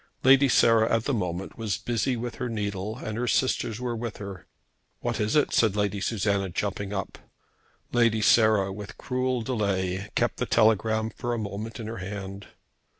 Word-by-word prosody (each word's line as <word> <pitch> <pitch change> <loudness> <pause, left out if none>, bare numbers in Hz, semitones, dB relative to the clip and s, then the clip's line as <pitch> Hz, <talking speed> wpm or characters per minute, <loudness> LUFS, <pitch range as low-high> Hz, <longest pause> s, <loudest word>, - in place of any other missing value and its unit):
Lady 135 +1 +6
Sarah, 115 -2 +4
at 115 - 0
the 140 - -1
moment, 90 -1 -3
was 105 -6 -1
busy 120 +2 -1
with 120 +1 -5
her 125 - -3
needle, 105 -1 -3
and 110 +1 -5
her 125 - -1
sisters 120 -3 +1
were 125 -1 -2
with 115 -1 -5
her. 100 -3 -8 0.5
"What - - -2
is 105 +4 0
it?" 150 - +3
said 110 -4 +3
Lady 105 -1 0
Susanna, 100 -2 0
jumping 100 +2 -3
up. 100 -2 -4 0.7
Lady 115 -3 +3
Sarah, 105 -4 +4
with 100 0 -9
cruel 125 -2 -1
delay, 100 -4 -1
kept - - +1
the - - -2
telegram 110 0 +2
for 120 +2 -3
a - - -3
moment 105 +2 -5
in 110 - -5
her 110 +1 -5
hand. 100 +1 -6
110 Hz, 175 wpm, -26 LUFS, 100-115 Hz, 0.7 s, Lady